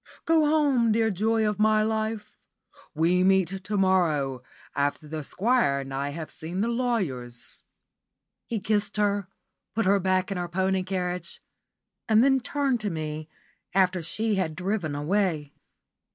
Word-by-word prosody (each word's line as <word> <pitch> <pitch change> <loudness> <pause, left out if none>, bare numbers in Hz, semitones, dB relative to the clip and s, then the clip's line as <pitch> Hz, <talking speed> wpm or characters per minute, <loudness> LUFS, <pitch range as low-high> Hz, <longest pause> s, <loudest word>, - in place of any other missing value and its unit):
Go 320 -2 +4
home, 285 -7 +3
dear 225 0 +2
joy 220 +3 +1
of 210 0 -2
my 215 0 +4
life! 220 -1 -2 0.6
We 175 +4 +3
meet 190 -2 +4
to 205 +1 -2
morrow, 160 -9 +2 0.3
after 145 +2 -1
the 155 0 -5
Squire 200 - +1
and 135 0 -7
I 140 +1 -2
have 155 +2 -6
seen 170 +4 -5
the 225 - +1
lawyers." 185 - -2 0.8
He 230 - -2
kissed 205 0 -1
her, 205 -2 +1 0.5
put 225 - +1
her 200 +1 +4
back 185 +1 +1
in 195 - -2
her 175 -1 -3
pony 190 +1 +1
carriage, 180 -1 -4 0.7
and 220 +1 +6
then 270 0 +4
turned 275 -1 0
to 215 -1 -2
me, 155 -2 -5 0.5
after 185 -2 +3
she 215 +7 -1
had 165 -5 -1
driven 180 -4 -2
away. 155 -2 0
190 Hz, 150 wpm, -26 LUFS, 160-220 Hz, 0.8 s, and